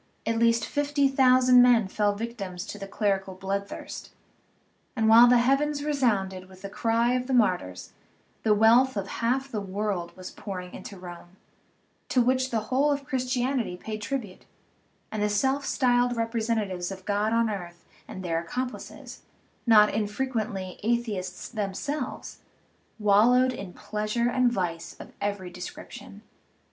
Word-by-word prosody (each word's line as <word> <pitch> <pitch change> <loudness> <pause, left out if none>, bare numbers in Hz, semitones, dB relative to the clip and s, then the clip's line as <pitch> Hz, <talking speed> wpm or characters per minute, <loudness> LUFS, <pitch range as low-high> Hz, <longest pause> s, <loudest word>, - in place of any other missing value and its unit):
at 225 0 0
least 230 0 +3
fifty 290 -1 +1
thousand 255 -2 +5
men 240 -4 +5
fell 205 +1 0
victims 200 -5 -5
to 205 - -8
the 195 - -6
clerical 195 -2 -1
bloodthirst. 195 +1 -5 0.9
And 220 -1 +1
while 230 +2 +8
the 245 0 +6
heavens 285 +4 +1
resounded 200 -11 0
with 190 0 -16
the 200 - -6
cry 230 +2 +1
of 250 0 -1
the 265 - +1
martyrs, 180 - 0 0.5
the 215 -1 +3
wealth 230 +3 +5
of 195 -1 -2
half 260 +6 -1
the 215 - -2
world 195 -3 -3
was 185 0 -8
pouring 180 -3 -7
into 200 - -9
Rome, 175 0 -11 0.7
to 255 - +2
which 255 +2 +2
the 225 -3 0
whole 280 +3 +3
of 280 -1 -2
Christianity 255 -6 -1
paid 215 +3 -6
tribute, 215 -4 -5 0.7
and 215 - -3
the 210 - +1
self 265 +7 0
styled 245 -1 +2
representatives 220 -5 -1
of 190 -1 -9
God 205 +1 0
on 230 0 +2
earth 175 -5 -6 0.2
and 185 - -8
their 165 -1 0
accomplices 250 +10 -6 0.5
(not 210 -2 +6
infrequently 210 -3 -3
Atheists 210 -5 -2
themselves) 245 +7 -4 0.6
wal 210 +1 +5
lowed 255 +1 +3
in 195 -6 -7
pleasure 215 +4 -2
and 250 -1 +3
vice 175 -6 -3
of - - -11
every 200 -3 -3
description. 180 0 -10
220 Hz, 145 wpm, -27 LUFS, 195-250 Hz, 0.9 s, while